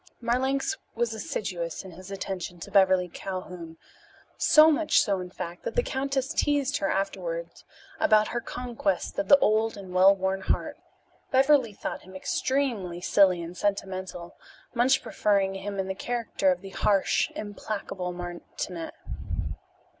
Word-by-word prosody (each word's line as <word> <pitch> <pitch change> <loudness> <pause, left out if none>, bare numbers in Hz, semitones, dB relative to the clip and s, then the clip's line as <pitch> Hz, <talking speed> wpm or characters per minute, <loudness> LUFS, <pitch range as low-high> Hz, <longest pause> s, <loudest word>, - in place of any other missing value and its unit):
Marlanx 265 +9 0 0.2
was 230 -1 0
assiduous 180 -6 -4
in 190 - -9
his 185 +3 -11
attention 190 -3 -5
to - - -8
Beverly 190 -2 +4
Calhoun 180 -2 -7 0.6
so 310 +1 +7
much 310 0 +3
so, 200 -4 +1
in 180 0 -6
fact, 175 -1 -7
that - - -5
the - - +3
countess 275 - -1
teased 285 -2 +1
her 300 - -1
afterwards - - -3 0.4
about 215 -1 +4
her 240 - -2
conquest 235 -3 -2
of 295 - -1
the 285 - +9
old 220 -3 +2
and 190 -2 -9
well 190 +2 +7
worn 190 0 -1
heart. - - -1 0.5
Beverly 265 -4 +4
thought - - -5
him 185 +1 -14
extremely 215 -4 -1
silly 185 -1 +4
and 170 +2 -8
sentimental, 190 -2 -3 0.4
much 250 +2 +3
preferring 200 -2 +1
him 200 +1 -5
in 190 -1 -1
the 190 - -2
character 225 -2 0
of 180 -1 -2
the 195 -1 -9
harsh, 195 +1 +2
implacable 205 -3 -4
martinet. 175 -1 -6
195 Hz, 145 wpm, -27 LUFS, 185-245 Hz, 0.6 s, the